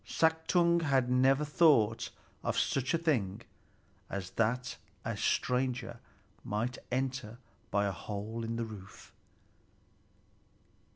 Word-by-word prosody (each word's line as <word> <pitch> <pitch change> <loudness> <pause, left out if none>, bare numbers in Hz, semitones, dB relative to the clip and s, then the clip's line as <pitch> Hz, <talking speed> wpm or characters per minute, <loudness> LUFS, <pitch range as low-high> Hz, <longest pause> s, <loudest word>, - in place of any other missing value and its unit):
Suttung 170 +1 +3
had 135 -5 +2
never 135 +3 +4
thought 145 -8 +4 0.3
of - - -1
such 135 +4 +1
a - - +3
thing 130 - 0 0.7
as 95 -2 -4
that 125 +3 0 0.3
a - - -1
stranger 125 -2 0 0.4
might 115 +4 -2
enter 130 -3 -2 0.3
by 100 0 +2
a 100 - 0
hole 105 +4 -5
in 115 0 -2
the 115 0 -1
roof! 100 -3 -11
125 Hz, 110 wpm, -32 LUFS, 110-140 Hz, 0.7 s, never